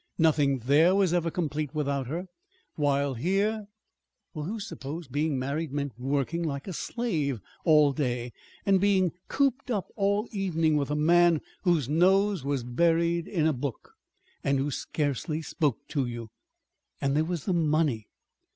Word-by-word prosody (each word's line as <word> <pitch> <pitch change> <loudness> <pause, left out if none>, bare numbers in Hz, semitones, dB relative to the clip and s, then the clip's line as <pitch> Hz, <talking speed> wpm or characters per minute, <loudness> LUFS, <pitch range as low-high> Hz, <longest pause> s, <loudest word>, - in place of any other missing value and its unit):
Nothing 150 -4 +3
there 160 +7 +5
was 195 -4 +3
ever 170 -1 +1
complete 155 -3 -3
without 140 -3 -1
her. 170 +7 -3 0.5
While 140 -2 +1
here 200 - 0 0.7
Well, 150 -3 -4
who 220 +6 -4
supposed 160 -7 -7
being 145 +1 0
married 140 +4 -2
meant 140 -1 -2
working 140 +6 -1
like 140 -2 -3
a 190 - -4
slave 155 - -2 0.3
all 150 -4 +5
day, 125 -3 -2 0.3
and 195 -2 +4
being 190 -3 +3 0.2
cooped 275 -1 0
up 205 -6 -1
all 200 +1 +1
the 230 - -14
evening 165 -5 +1
with 145 -1 0
a 150 - 0
man 170 +1 +4 0.3
whose 165 -8 +2
nose 190 +3 +3
was 140 -2 -1
buried 170 +6 +1
in 165 -6 0
a 160 - +3
book, 130 -1 -5 0.5
and 140 0 +2
who 140 +2 -1
scarcely 150 +3 -2
spoke 150 - 0
to 135 -4 0
you! 120 -2 -6 0.7
And 140 0 0
there 155 - +3
was 170 -2 -3
the 190 - +1
money. 155 -8 +1
155 Hz, 160 wpm, -28 LUFS, 140-175 Hz, 0.7 s, there